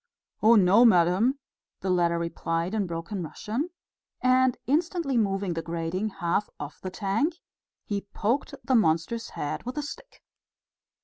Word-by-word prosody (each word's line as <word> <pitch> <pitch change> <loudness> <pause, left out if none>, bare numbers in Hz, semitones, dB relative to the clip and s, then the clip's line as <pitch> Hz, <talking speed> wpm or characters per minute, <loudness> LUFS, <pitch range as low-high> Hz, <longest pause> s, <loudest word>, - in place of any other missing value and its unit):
"Oh, 225 +2 +7
no, 200 +3 +6
madam," 200 +5 +4 0.4
the 190 - 0
latter 170 -2 +2
replied 170 +1 -2
in 210 -4 0
broken 170 +3 -4
Russian; 220 - -3 0.5
and 255 0 +3
instantly 325 0 0
moving 195 -4 +1
the 165 - -3
grating 170 +5 -2
half 175 +2 -1
off 145 0 -8
the 185 - -4
tank, 210 - 0 0.5
he 200 -1 -3
poked 245 +6 -1
the 265 - 0
monster's 215 +1 +2
head 145 - -4
with 250 +4 -6
a 295 - -1
stick. - - -10
205 Hz, 140 wpm, -27 LUFS, 170-250 Hz, 0.5 s, Oh